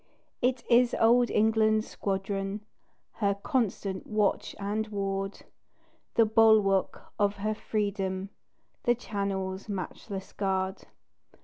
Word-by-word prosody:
It 250 0 +1
is 245 0 +4
old 240 +2 +5
England's 220 0 +3
squadron, 195 +1 -3 0.5
Her 200 -3 +1
constant 200 -5 -2
watch 210 -2 0
and 210 +2 -2
ward 195 -1 -3 0.7
The 230 - +6
bulwark 215 -3 +3
of 205 0 +2
her 215 +2 -1
freedom, 200 -3 -2 0.5
The 240 -1 +4
Channel's 200 -3 -3
matchless 195 0 -5
guard. 190 -1 -2
205 Hz, 100 wpm, -29 LUFS, 195-220 Hz, 0.7 s, The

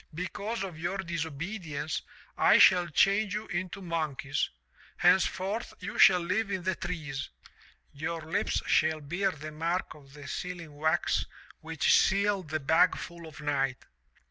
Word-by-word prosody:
Because 200 +5 -3
of 180 -5 -6
your 175 +4 -2
disobedience 165 -2 -4 0.3
I - - +5
shall 180 -2 +6
change 200 +5 +2
you 215 - -3
into 185 +2 -4
monkeys. 155 -5 -2 0.5
Hence 180 +1 +5
forth 210 +4 -4
you - - -6
shall 180 -2 +7
live 190 +5 -1
in 190 -2 -2
the 185 +1 +1
trees. 155 -6 -5 0.6
Your 160 +3 -3
lips 160 +1 -1
shall 155 0 +2
bear 175 +7 -1
the 155 0 -7
mark 165 +4 -2
of 140 -2 -17
the 145 -1 -10
sealing 175 -4 -6
wax 155 +3 +1 0.3
which 475 0 +1
sealed 200 - +2
the 155 +1 -1
bag 160 +6 +3
full 170 -1 -8
of 155 -1 -11
night. 135 -3 -1
170 Hz, 145 wpm, -29 LUFS, 155-190 Hz, 0.6 s, shall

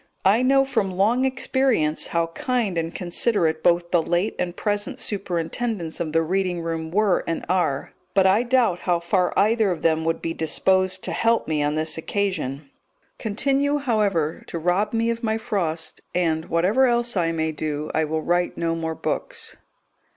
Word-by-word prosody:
I 205 +5 +5
know 270 +1 +4
from 210 -7 0
long 215 +8 +2
experience 255 - +1
how 170 0 +1
kind 240 -6 -1
and 165 0 -1
considerate 175 -3 +1
both 170 0 +2
the 175 - +4
late 175 +5 0
and 175 -1 -2
present 205 -1 -2
superintendents 180 -1 -3
of 160 -2 -2
the 165 +1 +2
reading 180 0 -1
room 165 -1 -3
were 200 +1 +2
and 165 - -2
are, 165 -6 0 0.2
but 195 -1 +5
I 190 +4 +5
doubt 240 -7 +2
how 175 -2 +1
far 180 +1 +1
either 220 0 +3
of 170 -4 -3
them 160 -1 +2
would 165 0 0
be 165 - -3
disposed 185 +4 +1
to - - -3
help 230 0 +1
me 155 -2 0
on 145 +1 0
this 160 +1 -2
occasion; 155 -8 -3 0.5
continue, 275 +7 +1
however, 205 - 0
to - - -5
rob 180 +5 +1
me 230 0 +1
of 230 0 -4
my 220 -2 0
Frost, 170 -7 -2
and, 160 -3 +1
whatever 195 +11 +3
else 240 -1 +1
I 170 -3 +1
may 160 -1 -1
do, 150 -1 -4
I 160 - +1
will 155 +1 -2
write 175 0 0
no 165 -1 0
more 160 -1 -3
books. - - -3
180 Hz, 175 wpm, -23 LUFS, 165-220 Hz, 0.5 s, I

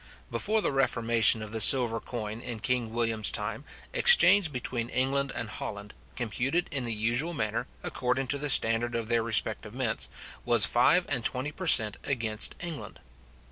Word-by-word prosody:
Before 220 0 0
the - - -1
reformation 115 -4 +2
of 105 - -9
the 110 0 -2
silver 120 -1 +7
coin 110 -1 -7
in 120 -3 -7
King 120 -1 -2
William's 115 -2 0
time, 110 +6 -4 0.3
exchange 205 - +5
between 120 -2 -5
England 135 +2 -1
and 115 - -5
Holland, 105 -1 -8 0.2
computed 130 +8 -2
in 135 -4 -4
the 115 - -3
usual 120 +10 -2
manner, 110 +1 -3 0.2
according 125 +1 -2
to 140 - 0
the 145 +1 -3
standard 115 -1 +2
of 115 -1 -4
their 120 -1 +1
respective 110 -1 -2
mints, 125 -4 -2 0.3
was 120 -4 +5
five 175 +9 +2
and 120 - -2
twenty 130 +5 -3
per 185 +4 -7
cent. 110 -9 +4
against 115 -6 -2
England. 170 -4 -8
120 Hz, 165 wpm, -27 LUFS, 110-135 Hz, 0.3 s, silver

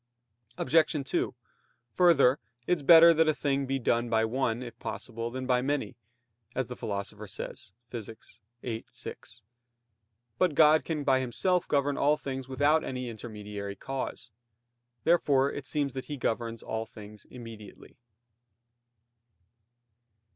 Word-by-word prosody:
Obj. 160 +4 +3
2: - - -1 0.6
Further, 150 -7 +5 0.3
it 180 - +2
is - - -9
better 165 +3 +9
that 160 0 +3
a 155 - +3
thing 140 -1 0
be 135 +1 0
done 120 -1 0
by 110 -1 +2
one, 120 0 -1
if 120 - -10
possible, 115 -1 -5
than 130 +2 -5
by 125 -1 +2
many, 135 -5 -2 0.6
as 130 - 0
the 125 - -7
Philosopher 105 0 -5
says 95 - -7 0.2
(Phys. 110 -1 -9 0.2
viii, 115 -2 -4
6). 115 0 -9 1.0
But 180 -5 +2
God 155 +1 +6
can 155 -3 -2
by 135 -1 +3
Himself 175 +9 0
govern 140 -1 +1
all 150 +2 +3
things 135 -3 -5
without 145 +4 +2
any 125 -1 -4
intermediary 105 -3 -7
cause. 135 -1 -5 0.7
Therefore 140 -4 +3
it 140 -1 -6
seems 145 -3 -1
that 130 -1 -5
He 145 - -5
governs 115 -2 -2
all 110 0 -3
things 105 -1 -12
immediately. 115 -5 -12
130 Hz, 135 wpm, -29 LUFS, 115-145 Hz, 1.0 s, better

